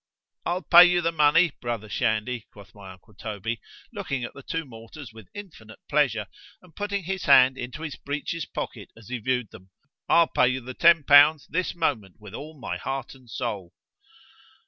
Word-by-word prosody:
——I'll 180 Hz, +2 st, -2 dB
pay 175 Hz, 0 st, +9 dB
you 175 Hz, 0 st, +3 dB
the 165 Hz, 0 st, 0 dB
money, 160 Hz, +2 st, +4 dB
brother 115 Hz, -3 st, -4 dB
Shandy, 110 Hz, +1 st, -2 dB
quoth 100 Hz, -4 st, -16 dB
my 100 Hz, -2 st, -12 dB
uncle 95 Hz, +4 st, -18 dB
Toby, 110 Hz, +2 st, -5 dB, 0.3 s
looking 150 Hz, -, -4 dB
at 120 Hz, -, -6 dB
the 140 Hz, -, -11 dB
two 165 Hz, +4 st, -4 dB
mortars 115 Hz, +1 st, -12 dB
with 110 Hz, -3 st, -14 dB
infinite 155 Hz, -, -11 dB
pleasure, 130 Hz, -8 st, +1 dB, 0.3 s
and 180 Hz, -3 st, -21 dB
putting 205 Hz, -1 st, -3 dB
his 190 Hz, 0 st, -4 dB
hand 130 Hz, -1 st, +6 dB
into 130 Hz, +5 st, -7 dB
his 155 Hz, -3 st, -6 dB
breeches 145 Hz, +3 st, -5 dB
pocket -, -, -6 dB
as 115 Hz, 0 st, -15 dB
he 125 Hz, -1 st, -4 dB
viewed 125 Hz, -1 st, -2 dB
them——I'll 110 Hz, -, -1 dB
pay 125 Hz, -, +3 dB
you 130 Hz, +1 st, -1 dB
the 125 Hz, +1 st, -8 dB
ten 165 Hz, +2 st, +5 dB
pounds 145 Hz, +1 st, +6 dB
this 185 Hz, +2 st, -3 dB
moment 120 Hz, -, -2 dB
with 105 Hz, -2 st, -13 dB
all 155 Hz, 0 st, -9 dB
my -, -, -4 dB
heart 135 Hz, -2 st, -5 dB
and 130 Hz, -3 st, -19 dB
soul. 105 Hz, -8 st, -5 dB
130 Hz, 180 wpm, -25 LUFS, 110-160 Hz, 0.3 s, pay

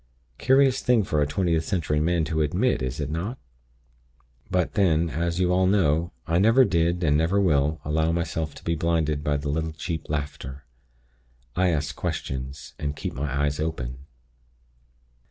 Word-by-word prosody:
Curious 135 Hz, 0 st, +4 dB
thing 120 Hz, -3 st, +3 dB
for 75 Hz, -5 st, 0 dB
a 75 Hz, -, +2 dB
Twentieth 85 Hz, 0 st, 0 dB
Century 80 Hz, -4 st, 0 dB
man 85 Hz, +1 st, +1 dB
to 80 Hz, 0 st, -1 dB
admit, 75 Hz, -3 st, +1 dB
is 65 Hz, +2 st, -3 dB
it 75 Hz, -1 st, -3 dB
not? 95 Hz, +11 st, -3 dB, 1.1 s
But, 90 Hz, -1 st, 0 dB
then, 85 Hz, -5 st, +2 dB
as 85 Hz, +3 st, -1 dB
you 90 Hz, -1 st, +2 dB
all 95 Hz, 0 st, +3 dB
know, 85 Hz, -4 st, +2 dB
I 85 Hz, +3 st, +1 dB
never 115 Hz, +6 st, +5 dB
did, 85 Hz, -1 st, +1 dB
and 75 Hz, -2 st, +3 dB
never 80 Hz, +6 st, +2 dB
will, 75 Hz, -4 st, +2 dB
allow 80 Hz, +2 st, +1 dB
myself 80 Hz, -2 st, -2 dB
to -, -, -12 dB
be 85 Hz, -, 0 dB
blinded 80 Hz, -3 st, 0 dB
by 75 Hz, -1 st, +1 dB
the 70 Hz, +1 st, -4 dB
little 80 Hz, +2 st, -1 dB
cheap 80 Hz, -1 st, -5 dB
laughter. 70 Hz, -2 st, -4 dB, 0.9 s
I 90 Hz, +1 st, +3 dB
ask 75 Hz, -3 st, -1 dB
questions, 65 Hz, +1 st, -5 dB
and 75 Hz, -1 st, -3 dB
keep -, -, -4 dB
my 70 Hz, +2 st, -3 dB
eyes 75 Hz, 0 st, 0 dB
open. 70 Hz, -4 st, -4 dB
80 Hz, 165 wpm, -25 LUFS, 75-90 Hz, 1.1 s, never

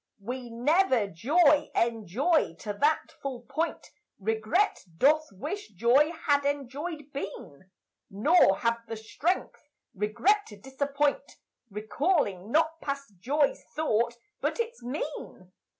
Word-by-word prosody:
We 250 Hz, +2 st, -5 dB
never 255 Hz, -, +2 dB
joy 290 Hz, -, +3 dB
enjoy 230 Hz, -, +1 dB
to 210 Hz, -, -3 dB
that 300 Hz, +8 st, +1 dB
full 265 Hz, -3 st, -4 dB
point 320 Hz, +7 st, -3 dB, 0.3 s
Regret 220 Hz, -, +1 dB, 0.2 s
doth 310 Hz, -, +4 dB
wish 300 Hz, -, -5 dB
joy 245 Hz, -, +4 dB
had 285 Hz, -1 st, +4 dB
enjoyèd 285 Hz, +2 st, -4 dB
been, 190 Hz, -, -7 dB, 0.4 s
Nor 210 Hz, -, +4 dB
have 230 Hz, 0 st, +1 dB
the 225 Hz, -, -5 dB
strength 300 Hz, +11 st, -2 dB, 0.3 s
regret 320 Hz, -, +1 dB
to 210 Hz, -, -11 dB
disappoint 280 Hz, -, -1 dB, 0.4 s
Recalling 215 Hz, -, 0 dB
not 325 Hz, +2 st, +2 dB
past 275 Hz, -5 st, -4 dB
joy's 285 Hz, +8 st, +1 dB
thought, 235 Hz, -6 st, +1 dB, 0.2 s
but -, -, -2 dB
its 465 Hz, +1 st, -3 dB
mien. 245 Hz, -8 st, -6 dB
275 Hz, 115 wpm, -28 LUFS, 220-310 Hz, 0.4 s, doth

